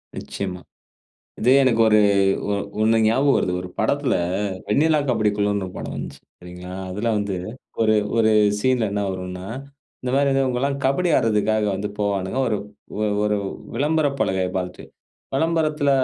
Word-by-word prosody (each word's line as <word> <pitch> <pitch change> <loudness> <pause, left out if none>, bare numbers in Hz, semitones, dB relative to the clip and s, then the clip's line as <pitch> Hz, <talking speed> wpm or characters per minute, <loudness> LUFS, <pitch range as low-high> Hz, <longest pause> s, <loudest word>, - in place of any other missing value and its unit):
நிச்சயமா. 90 -2 -5 0.8
இது 120 - +3
எனக்கு 115 -3 +2
ஒரு 110 0 +5 0.5
ஒ 100 - +2 0.3
ஒண்ணு 110 +1 +4
ஞாபகம் 135 +5 +3
வருது. 90 - 0
ஒரு 90 - -7
படத்தில - - +1 0.5
வெண்ணிலா 155 +7 +3
கபடி 110 -3 +2
குழுன்னு 100 -1 0
ஒரு 90 - -9
படம் - - -5
வந்துச்சு. - - -7 0.2
சரிங்களா? 90 +1 -10 0.2
அதில 105 +5 -1
வந்து 100 -1 -2 0.5
ஒரு, 110 -1 +4 0.2
ஒரு 110 -1 +4 0.3
சீன்ல 125 -1 +1
என்ன 105 - -1
வரும்னா, 90 0 -6 0.6
இந்த 125 - -2
மாரி 140 0 +3
வந்து 135 0 +2
இவங்கயெல்லாம் 130 +2 0
கபடி 140 +7 +2
ஆட்றதுக்காக 110 -2 +1
வந்து 100 +2 -3
போவாணுங்க, 100 +2 -1
ஒரு 105 - 0 0.7
ஒரு 105 0 +1 0.4
விளம்பர 155 +1 +1
பலகை 95 -1 +1
பாத்துட்டு. 90 -1 -4 0.5
விளம்பரத்தில 155 -1 +1
110 Hz, 140 wpm, -22 LUFS, 100-135 Hz, 0.8 s, ஒரு